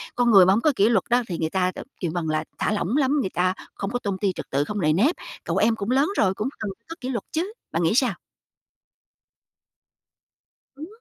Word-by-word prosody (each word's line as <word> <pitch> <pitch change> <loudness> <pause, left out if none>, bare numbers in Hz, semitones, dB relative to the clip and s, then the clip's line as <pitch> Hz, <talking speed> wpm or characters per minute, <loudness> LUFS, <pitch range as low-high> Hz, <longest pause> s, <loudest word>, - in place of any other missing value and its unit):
con 245 -1 +3
người 195 -4 +8
mà 190 - +5
hổng 220 - +1
có 310 - +4
kỷ 205 +1 +4
luật 220 -6 +3
đó 245 +1 +4
thì 175 - -3
người 160 -1 -1
ta, 185 0 +1 0.3
kêu 170 -4 -2
bằng 170 -3 -2
là 155 0 0
thả - - 0
lỏng 210 +4 0
lắm, 285 0 +2
người 190 - -2
ta 185 +2 +1 0.2
không 195 - -4
có 245 - -1
tôn 200 -4 -3
ti 195 0 0
trật - - -6
tự, 140 +2 +1
không 210 +6 -4
nề 155 -2 +3
nếp. 245 - +3 0.3
Cậu - - -2
em 225 +1 +3
cũng 210 +2 -3
lớn 275 +5 +3
rồi, 190 -2 +3
cũng 215 +6 -2
cần 215 - -3 0.2
có 330 - -6
kỷ 255 - -4
luật 245 -3 -2
chứ. 360 +7 -2 0.2
Bạn 165 - 0
nghĩ 165 - +2
sao? 250 -4 +3 2.6
Ừm. 305 +4 -8
210 Hz, 235 wpm, -24 LUFS, 180-250 Hz, 2.6 s, người